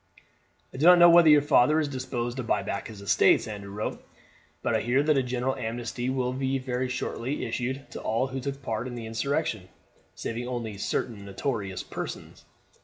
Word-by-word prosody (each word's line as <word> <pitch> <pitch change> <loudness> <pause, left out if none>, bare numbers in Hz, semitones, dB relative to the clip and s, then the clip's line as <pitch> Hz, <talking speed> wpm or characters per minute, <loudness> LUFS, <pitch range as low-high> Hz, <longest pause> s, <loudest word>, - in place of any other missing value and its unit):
"I - - -8
do 155 +6 +3
not 180 0 +9
know 175 0 +8
whether 170 -1 +7
your 150 -1 +7
father 145 +2 +4
is 155 - 0
disposed 130 -2 -4
to 130 - -2
buy 115 - 0
back - - -4
his 105 -3 -10
estates," 100 - +4
Andrew 100 -2 -7
wrote, 105 +2 -4 0.6
"but - - 0
I - - +1
hear 125 +5 +2
that 155 0 +3
a 135 - +3
general 125 +1 -1
amnesty 120 +2 -3
will 130 -1 -1
very 130 -1 -1
shortly 130 +1 -3
be - - -4
issued 130 +4 -4
to - - -7
all 115 +4 0
who 135 0 -4
took 140 +1 -5
part 115 0 -3
in 125 - -6
the 115 -2 -6
insurrection, 115 - -2 0.5
saving 120 +2 -4
only 115 -5 -4
certain 105 0 -2
notorious 100 -1 -3
persons. - - -7
125 Hz, 190 wpm, -27 LUFS, 115-135 Hz, 0.6 s, not